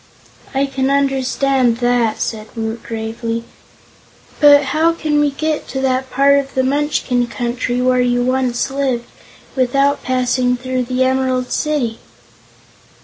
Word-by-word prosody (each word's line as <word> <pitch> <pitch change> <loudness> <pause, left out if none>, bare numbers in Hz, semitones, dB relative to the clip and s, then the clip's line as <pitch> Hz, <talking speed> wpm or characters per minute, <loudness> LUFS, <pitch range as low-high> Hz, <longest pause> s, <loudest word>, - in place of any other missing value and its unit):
"I 275 +1 +2
can 270 -1 -1
understand 270 -2 +1
that," 240 -2 +1
said 215 -1 -3
Woot 225 0 -4
gravely. 230 +1 -4 1.0
"But 290 -1 +7
how 325 +2 +3
can 305 -3 0
we 295 0 +3
get 310 +2 -3
to 265 - -4
that 260 0 0
part 280 +2 +4
of 275 -1 -6
the 260 - +2
Munchkin 265 -3 0
Country 240 0 -2
where 255 0 +3
you 245 0 +1
once 255 0 0
lived 265 -4 -1 0.5
without 275 +2 +2
passing 250 0 0
through 255 0 -2
the 255 +1 0
Emerald 260 -1 0
City?" 280 -7 -1
255 Hz, 135 wpm, -17 LUFS, 245-275 Hz, 1.0 s, But